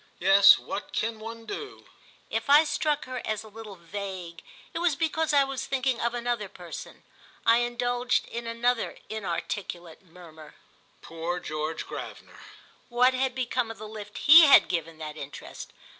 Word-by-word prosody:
"Yes, 195 +2 +7
what 205 - -7
can 225 0 -2
one 225 +1 -8
do?" 410 - -8 0.5
If 225 +3 -2
I 295 +2 +8
struck 300 -1 -1
her 255 -1 -5
as 215 -1 -3
a - - -13
little 215 -1 -10
vague 180 -1 -7 0.3
it 330 - -3
was 340 -4 +2
because 320 +1 0
I 285 -1 +5
was 270 -1 -5
thinking 260 -2 -1
of 235 +1 -1
another 235 -4 -2
person. 175 -3 -10 0.4
I 230 0 +6
indulged 245 +1 0
in 235 0 -6
another 235 +1 -1
inarticulate 175 -4 -5
murmur—"Poor 165 0 -9
George 155 0 -4
Gravener!" - - -9 0.5
What 250 +1 +3
had 260 0 -1
become 250 -2 -1
of 225 - -8
the 215 - -8
lift 210 -1 -9
he 315 +2 +9
had 280 - +7
given 165 -2 -3
that 155 -1 -7
interest? 140 -1 -9
225 Hz, 155 wpm, -27 LUFS, 180-255 Hz, 0.5 s, he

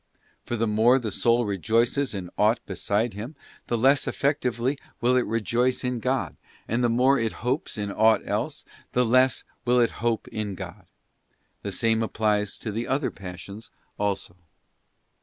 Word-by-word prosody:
For 120 - -3
the 115 0 +1
moré 115 +4 +4
the 110 -4 -4
soul 120 +4 +2
rejoices 115 - +1
in 90 -3 -5
aught 110 +3 +3
beside 105 +4 -1
Him, 115 +10 -7 0.3
the 120 - 0
less 135 +4 +4
effectively 135 -1 0 0.2
will 125 +1 +3
it 125 - +2
rejoice 120 +4 0
in 125 -1 -1
God, 125 - -1 0.3
and 120 +3 0
the 120 - +3
more 130 +4 +4
it 115 -1 -1
hopes 130 +1 -1
in 100 -1 -2
aught 110 +2 +3
else, 120 +9 -2 0.3
the 125 0 +3
less 130 0 +3 0.2
will 125 0 +3
it 120 - +3
hope 115 -2 0
in 105 -3 -3
God. - - -9 0.7
The - - -4
same 115 -1 +1
applies 105 -2 0
to 110 - -5
the 115 +3 -3
other 135 +2 0
passions 100 +3 -9 0.3
also. 100 -3 -2
115 Hz, 160 wpm, -26 LUFS, 105-125 Hz, 0.7 s, moré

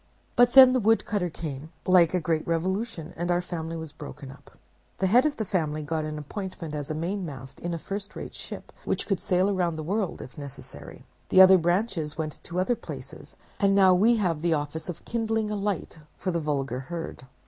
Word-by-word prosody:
But 245 0 +5
then 260 -1 +10
the 255 - +3
woodcutter 210 -4 +2
came, 155 -2 -6
like 185 -2 +5
a - - +3
great 160 -1 -1
revolution, 180 +1 -2
and 175 +1 -3
our 175 0 +3
family 165 -2 -4
was 160 -2 -6
broken 145 -2 -9
up. 140 +1 -17 0.4
The 190 - 0
head 245 +9 +5
of 295 - -2
the 220 - -2
family 155 -6 -1
got 155 +1 -2
an 155 0 -4
appointment 165 +1 -6
as 145 -2 -4
mainmast 155 -6 -4
in 175 - -4
a - - -3
first 200 +4 -6
rate - - -7
ship, - - -7
which - - -1
could 195 -3 0
sail 185 +2 +2
round 175 -4 0
the 155 - -4
world 195 +3 -1
if 125 - -10
necessary; 140 -2 -10 0.2
the 185 - +5
other 190 0 +9
branches 175 -3 0
went 155 -2 -5
to 175 +1 -3
other 215 +7 +2
places, - - -9 0.2
and 195 -1 +3
now 190 -2 +6
we 220 +6 +5
have 175 -8 0
the 170 -1 +2
office 150 +3 -4
of 175 - -7
kindling 225 -2 -1
a - - -1
light 200 -5 -3 0.2
for 185 - -2
the 170 - 0
vulgar 140 -5 -2
herd. 165 -2 -7
175 Hz, 205 wpm, -27 LUFS, 155-200 Hz, 0.4 s, then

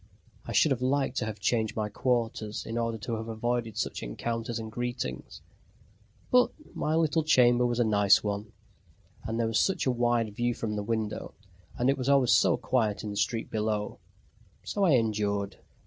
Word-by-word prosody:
I - - -4
should 155 - +4
have 130 -2 0
liked 135 0 0
to 110 - -1
have 110 -1 -5
changed 110 +1 0
my 110 -1 -1
quarters 110 -1 -1
in 115 - -5
order 115 -1 -1
to 110 +2 -4
have 110 +1 -6
avoided 115 0 -2
such - - -2
encounters 115 - -3
and 110 -1 -6
greetings; 120 - -5 0.9
but 250 0 +5 0.2
my 155 - -1
little 160 0 +2
chamber 125 -4 +4
was 120 0 -1
a - - +5
nice 105 -3 +4
one, 105 0 -3 0.7
and 115 +1 -2
there 115 - +2
was 115 0 +1
such 195 - +1
a 130 - +3
wide 120 -3 0
view 120 +1 0
from 105 -2 -3
the 105 - -2
window, 110 0 -3 0.4
and 125 - +1
it 135 0 +2
was 130 +1 -1
always 135 -3 +5
so - - +4
quiet 110 -5 0
in 105 - -4
the - - -6
street 110 +3 -1
below 105 -2 -2 0.6
so 200 -1 0
I 165 - +4
endured. 105 -4 0
115 Hz, 185 wpm, -28 LUFS, 105-125 Hz, 0.9 s, but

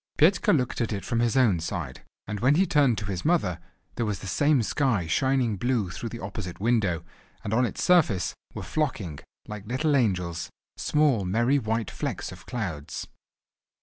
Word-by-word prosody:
Petka 175 +6 +4
looked 125 -5 +1
at 115 - -1
it 100 -2 -3
from 115 - 0
his 120 +2 +2
own 110 -10 +4
side, 80 -6 -4 0.2
and 105 -1 -4
when 130 +7 +4
he 190 +4 +4
turned 140 - +3
to 105 - -3
his 95 -2 -3
mother, 150 - +1 0.3
there 120 - -1
was 105 -2 -1
the 95 - -10
same 135 - +2
sky 115 - +1
shining 130 - +1
blue 120 -5 0
through 115 - -5
the 115 - -7
opposite 95 -2 -6
window, 100 -7 +1 0.4
and 105 - -3
on 125 +2 +3
its - - -4
surface 155 - +3 0.2
were - - -5
flocking—like 105 - -4
little 140 +5 +1
angels—small, 105 - 0
merry 120 +9 +2
white 110 -2 -2
flecks - - -4
of - - -13
clouds. 95 - -4
115 Hz, 170 wpm, -26 LUFS, 95-130 Hz, 0.4 s, Petka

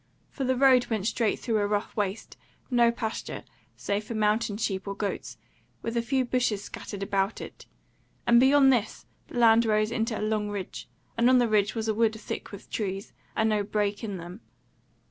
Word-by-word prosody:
For 270 - -3
the 260 0 +2
road 255 -1 +5
went 215 -4 -2
straight 230 -1 +1
through 225 -3 -1
a 205 - +1
rough 205 0 -2
waste, 205 0 -3 0.4
no 240 -1 +5
pasture, 230 -2 -5 0.3
save 205 +1 -2
for 225 +2 -6
mountain 215 0 +1
sheep 195 -3 -2
or 200 - -3
goats, 200 0 -4 0.5
with 230 +1 -3
a 235 - +2
few 260 +2 0
bushes 240 -5 0
scattered 200 -2 -7
about 195 +1 0
it; - - -10 0.6
and 235 0 +6
beyond 270 +1 +6
this 230 -3 -2 0.2
the - - -8
land 230 -1 +6
rose 215 -1 +1
into 225 -1 -1
a - - -3
long 215 -1 -1
ridge; 180 - -6 0.3
and 240 +2 +5
on 255 - +6
the 245 -1 +3
ridge 210 -1 +2
was 225 -1 -2
a 220 - +2
wood 220 0 +1
thick - - -6
with 200 -1 -10
trees, 195 -2 -3 0.2
and 220 0 +2
no 210 -1 +2
break 205 0 -1
in 205 -4 -4
them. 175 +5 -9
220 Hz, 195 wpm, -27 LUFS, 205-235 Hz, 0.6 s, and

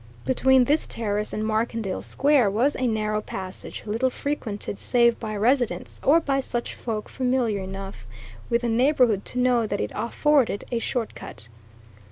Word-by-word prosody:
Between 260 - +4
this 295 +5 +1
terrace 210 -2 -2
and 215 - -2
Markendale 220 -2 -1
Square 275 -6 +3
was 240 +9 +1
a 255 - 0
narrow 215 -1 0
passage, 190 -2 -6
little 225 +5 0
frequented 235 -8 -4
save 235 -2 +3
by 215 -1 -4
residents, 245 +3 0
or 310 +4 +6
by 275 -4 0
such 240 -3 -3
folk 220 -3 -4
familiar 250 -5 0
enough 195 - -7 0.4
with 235 +1 +1
the - - +1
neighbourhood 240 -3 +3
to - - -6
know 245 -3 +3
that - - -2
it 105 - -2
afforded 235 0 +1
a 235 - 0
shortcut. 225 - -5
230 Hz, 155 wpm, -25 LUFS, 210-260 Hz, 0.4 s, or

